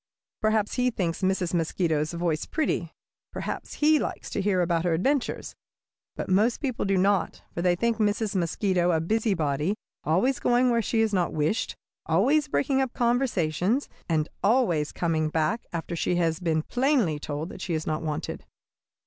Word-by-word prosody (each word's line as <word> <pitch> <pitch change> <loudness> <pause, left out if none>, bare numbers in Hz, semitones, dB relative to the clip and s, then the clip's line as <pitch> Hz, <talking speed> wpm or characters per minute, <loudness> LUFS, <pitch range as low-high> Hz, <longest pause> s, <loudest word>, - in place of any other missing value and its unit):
Perhaps 215 -1 +1
he 250 0 +3
thinks 175 -7 -2
Mrs. 185 -2 0
Mosquito's 160 -2 0
voice 170 -2 -1
pretty. 255 - -1 0.4
Perhaps - - -5
he 305 0 +4
likes - - -4
to - - -1
hear 190 -2 +2
about 170 -1 +1
her 175 -2 +2
adventures. 265 - -1 0.6
But - - -4
most 210 +6 +2
people 260 -7 -2
do 195 -1 +2
not, 195 -1 +1
for 170 - -3
they 175 0 +3
think 235 +4 0
Mrs. 210 -1 0
Mosquito 180 0 +1
a 165 -2 +3
busybody, 170 - 0 0.3
always 195 - +2
going 245 +1 +3
where 235 -1 +2
she 225 +1 +1
is 220 -2 +1
not 180 -3 +1
wished, 155 +8 0 0.3
always 265 - +3
breaking 275 -2 +1
up 265 -2 -2
conversations, 235 - +1 0.2
and 155 -2 +1 0.2
always 195 - +2
coming 160 -2 0
back 160 +9 0
after 170 0 -4
she 175 - 0
has 165 -2 +1
been 160 -3 0
plainly 245 - +1
told 150 +3 -4
that 190 - -9
she 175 -3 -2
is 155 - -3
not 155 0 -1
wanted. 155 -2 -4
185 Hz, 165 wpm, -26 LUFS, 165-235 Hz, 0.6 s, he